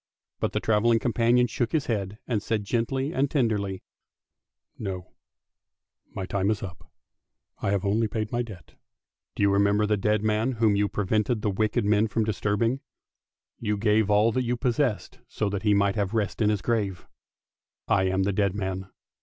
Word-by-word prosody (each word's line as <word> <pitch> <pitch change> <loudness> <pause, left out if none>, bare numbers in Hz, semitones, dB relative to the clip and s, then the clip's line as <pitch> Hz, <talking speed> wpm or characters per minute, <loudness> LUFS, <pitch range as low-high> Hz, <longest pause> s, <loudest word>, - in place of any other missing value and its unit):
But - - -1
the - - +1
travelling 110 +1 +3
companion 120 +1 +3
shook 120 -1 -2
his 155 -3 +1
head, 105 -3 -2
and 115 -5 -1
said 110 0 -1
gently 130 +7 -1
and 135 +1 +1
tenderly, 105 -9 0 1.0
"No; 95 -3 -5 1.0
my 95 - -3
time 100 +1 0
is 110 -2 -1
up. 90 -3 -9 0.7
I - - -1
have 100 0 0
only 110 +3 +2
paid 110 0 -3
my 120 - 0
debt. 105 -7 -9 0.6
Do - - 0
you 100 - +4
remember 100 +1 +3
the 105 0 +1
dead 105 +1 +1
man 110 +4 +1
whom 110 -3 +2
you 100 0 +1
prevented 105 +3 0
the 105 - +1
wicked 110 +3 0
men 105 +1 +3
from 110 +1 0
dis 105 -3 -3
turbing. 115 +5 +1 0.8
You 105 -2 -1
gave 105 0 +2
all 105 +2 +4
that 130 - 0
you 125 0 -1
possessed 125 -2 -1
so 105 - -2
that 100 -1 -3
he 105 -2 +3
might 100 +1 +2
have 100 +1 -1
rest 105 0 -1
in 105 - +4
his 105 -3 -1
grave. 105 -6 -1 0.8
I 95 - +3
am 95 0 +1
the 100 +1 0
dead 100 -1 +1
man! 95 -1 -3
105 Hz, 180 wpm, -26 LUFS, 100-115 Hz, 1.0 s, you